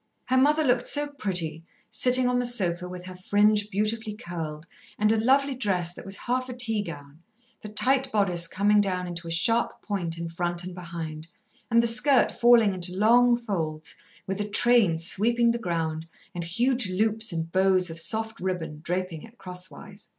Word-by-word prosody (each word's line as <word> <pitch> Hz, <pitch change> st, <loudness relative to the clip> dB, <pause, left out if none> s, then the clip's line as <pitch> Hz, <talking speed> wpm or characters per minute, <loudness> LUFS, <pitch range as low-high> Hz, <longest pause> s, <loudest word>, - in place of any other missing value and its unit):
Her 260 Hz, -, +1 dB
mother 300 Hz, +4 st, +3 dB
looked 245 Hz, -3 st, +1 dB
so 290 Hz, 0 st, +2 dB
pretty, 175 Hz, -, -3 dB, 0.3 s
sitting 250 Hz, +3 st, +2 dB
on 250 Hz, 0 st, +1 dB
the 245 Hz, -, 0 dB
sofa 180 Hz, -7 st, -1 dB
with 180 Hz, 0 st, -8 dB
her 185 Hz, -, -8 dB
fringe 205 Hz, +3 st, +2 dB
beautifully 215 Hz, +2 st, -2 dB
curled 165 Hz, -6 st, -6 dB, 0.3 s
and 210 Hz, 0 st, +3 dB
a 220 Hz, 0 st, +1 dB
lovely 275 Hz, +3 st, +3 dB
dress 185 Hz, -9 st, -1 dB
that -, -, -11 dB
was 195 Hz, +1 st, -4 dB
half 255 Hz, +1 st, -2 dB
a 250 Hz, -, -6 dB
teagown, 170 Hz, -, -2 dB, 0.4 s
the 215 Hz, -, -8 dB
tight 260 Hz, +5 st, +2 dB
bodice 180 Hz, -5 st, +1 dB
coming 205 Hz, +4 st, +3 dB
down 185 Hz, -2 st, -1 dB
into 170 Hz, -1 st, -7 dB
a -, -, -5 dB
sharp 225 Hz, +8 st, +1 dB
point 175 Hz, -6 st, -3 dB
in 170 Hz, 0 st, -4 dB
front 175 Hz, +1 st, -3 dB
and 180 Hz, 0 st, -7 dB
behind, 165 Hz, -3 st, -7 dB, 0.4 s
and 235 Hz, 0 st, +4 dB
the -, -, +2 dB
skirt 255 Hz, +4 st, +3 dB
falling 235 Hz, -4 st, +4 dB
into 180 Hz, 0 st, -3 dB
long 240 Hz, +3 st, +5 dB
folds, 160 Hz, -9 st, -4 dB, 0.3 s
with 195 Hz, +2 st, -3 dB
a 205 Hz, -, -4 dB
train 215 Hz, -5 st, +3 dB
sweeping 230 Hz, +8 st, +2 dB
the 235 Hz, -, -2 dB
ground, 165 Hz, -5 st, -3 dB, 0.3 s
and 175 Hz, -2 st, -5 dB
huge 240 Hz, +5 st, +1 dB
loops 220 Hz, +3 st, 0 dB
and 165 Hz, -1 st, -4 dB
bows 185 Hz, -1 st, +2 dB
of 165 Hz, -, -5 dB
soft 220 Hz, +5 st, -3 dB
ribbon 165 Hz, -5 st, -4 dB
draping 180 Hz, -2 st, -3 dB
it 230 Hz, +1 st, -15 dB
cross 180 Hz, -2 st, -7 dB
wise. 200 Hz, 0 st, -13 dB
200 Hz, 180 wpm, -26 LUFS, 175-235 Hz, 0.4 s, long